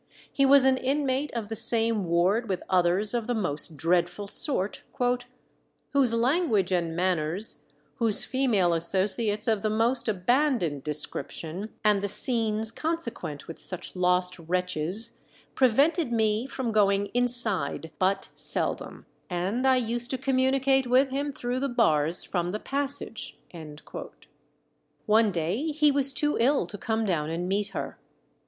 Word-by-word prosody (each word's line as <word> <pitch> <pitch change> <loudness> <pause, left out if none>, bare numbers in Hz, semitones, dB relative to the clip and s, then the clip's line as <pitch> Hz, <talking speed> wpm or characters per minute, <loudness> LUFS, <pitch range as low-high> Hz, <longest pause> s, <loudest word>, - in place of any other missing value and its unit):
He 275 -1 +2
was 275 -1 +6
an 265 -1 +3
inmate 275 +1 -1
of 225 -3 -4
the 225 - -5
same 225 -2 +6
ward 185 +7 0
with 185 -2 -3
others 185 +4 +1
of 235 -2 -2
the 245 - -1
most 155 -6 -2
dreadful 175 +5 0
sort, 200 - -1 1.1
"whose 265 -5 +2
language 230 - +1
and 170 -3 -1
manners, 180 +2 -2 0.4
whose 225 -3 +4
female 220 -10 +1
associates 205 +6 0
of 220 -3 +1
the 215 - -1
most 230 +4 0
abandoned 210 - 0
description, 155 +5 -2
and 210 -2 +3
the 200 - -3
scenes 220 -1 +5
consequent 240 - -5
with 165 - -9
such 180 0 -6
lost 180 0 0
wretches, 180 +5 -1 0.3
prevented 275 +4 +2
me 220 +1 0
from 260 -3 -4
going 200 -1 +1
inside 240 -9 +2
but 195 +1 0
seldom, - - -4 0.2
and 195 +9 -2
I 260 - +4
used 240 0 -2
to 260 - -2
communicate 265 0 +1
with 260 +3 +3
him 285 +2 -3
through 245 -1 -4
the 275 +1 -2
bars 165 - +1
from 175 0 -3
the 210 - -3
passage." 280 -4 -1 1.7
One 215 -1 +3
day 180 - -2
he 300 -1 +2
was 275 -1 +1
too 295 +2 -1
ill 265 -1 +2
to 205 +4 -9
come 220 +2 -2
down 160 -6 -1
and 170 +2 -4
meet 200 +2 -1
her. - - -7
220 Hz, 140 wpm, -26 LUFS, 180-255 Hz, 1.7 s, was